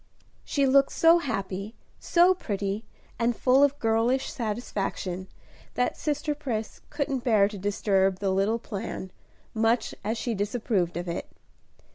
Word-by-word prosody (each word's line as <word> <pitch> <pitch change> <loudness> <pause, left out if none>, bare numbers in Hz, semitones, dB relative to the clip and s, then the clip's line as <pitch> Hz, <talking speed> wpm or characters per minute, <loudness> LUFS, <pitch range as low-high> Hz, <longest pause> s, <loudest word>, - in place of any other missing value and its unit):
She 280 -1 +1
looked 275 +1 +4
so 330 +1 +5
happy, 200 - -4 0.2
so 355 +2 +4
pretty, 205 - -3 0.4
and 235 0 +1
full 255 +4 +4
of 285 0 +3
girlish 230 +3 +1
satisfaction, 205 -5 -3 0.5
that 250 - +1
sister 300 0 -1
Pris 240 -7 -4
couldn't 275 -4 -2
bear 215 -5 +4
to 205 -1 -8
disturb 195 -1 +1
the 195 0 -1
little 195 +4 +2
plan, 200 -4 -6 0.4
much 225 +2 +1
as 220 +3 -1
she 235 +1 -2
disapproved 205 -4 -1
of 175 +1 -4
it. 170 - -4
225 Hz, 135 wpm, -27 LUFS, 195-260 Hz, 0.5 s, so